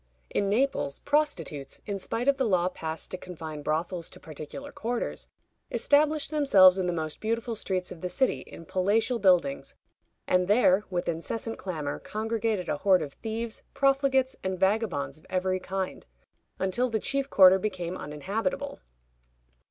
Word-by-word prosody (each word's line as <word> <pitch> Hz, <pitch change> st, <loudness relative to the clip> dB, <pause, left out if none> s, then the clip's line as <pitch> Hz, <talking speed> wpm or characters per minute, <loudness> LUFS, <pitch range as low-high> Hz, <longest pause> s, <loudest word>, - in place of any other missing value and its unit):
In 200 Hz, -, +1 dB
Naples, 220 Hz, -, +1 dB
prostitutes, 185 Hz, -, -1 dB
in 200 Hz, -1 st, -3 dB
spite 230 Hz, +6 st, -2 dB
of 280 Hz, -1 st, +4 dB
the 265 Hz, -3 st, +1 dB
law 180 Hz, -3 st, +2 dB
passed 160 Hz, -3 st, -5 dB
to 185 Hz, -, -4 dB
confine 160 Hz, -5 st, -7 dB
brothels 165 Hz, +3 st, -2 dB
to -, -, -12 dB
particular 155 Hz, -, -8 dB
quarters, 235 Hz, +1 st, -3 dB, 0.4 s
established 300 Hz, +1 st, +2 dB
themselves 195 Hz, -12 st, +6 dB
in 185 Hz, -, 0 dB
the -, -, +1 dB
most 160 Hz, -2 st, -3 dB
beautiful 230 Hz, +2 st, -1 dB
streets 185 Hz, -4 st, -2 dB
of 165 Hz, -, -9 dB
the 180 Hz, -, -2 dB
city 260 Hz, +7 st, +1 dB
in 165 Hz, -, -11 dB
palatial 205 Hz, +7 st, +1 dB
buildings, 195 Hz, +8 st, +2 dB, 0.5 s
and 180 Hz, 0 st, +2 dB
there, 205 Hz, -2 st, +4 dB
with 180 Hz, -2 st, -2 dB
incessant 225 Hz, +7 st, -3 dB
clamor, 155 Hz, -6 st, -4 dB
congregated 220 Hz, -3 st, -2 dB
a -, -, -1 dB
horde 185 Hz, 0 st, +4 dB
of 140 Hz, -2 st, -7 dB
thieves, 225 Hz, 0 st, -4 dB
profligates, 275 Hz, -1 st, +2 dB
and 190 Hz, -1 st, -2 dB
vagabonds 190 Hz, -8 st, 0 dB
of -, -, -22 dB
every 185 Hz, 0 st, 0 dB
kind, 190 Hz, 0 st, -4 dB, 0.5 s
until 190 Hz, +7 st, 0 dB
the 220 Hz, -1 st, 0 dB
chief 275 Hz, +5 st, -1 dB
quarter 190 Hz, 0 st, +7 dB
became 185 Hz, -3 st, -3 dB
uninhabitable. 200 Hz, -, -3 dB
190 Hz, 150 wpm, -28 LUFS, 180-235 Hz, 0.5 s, quarter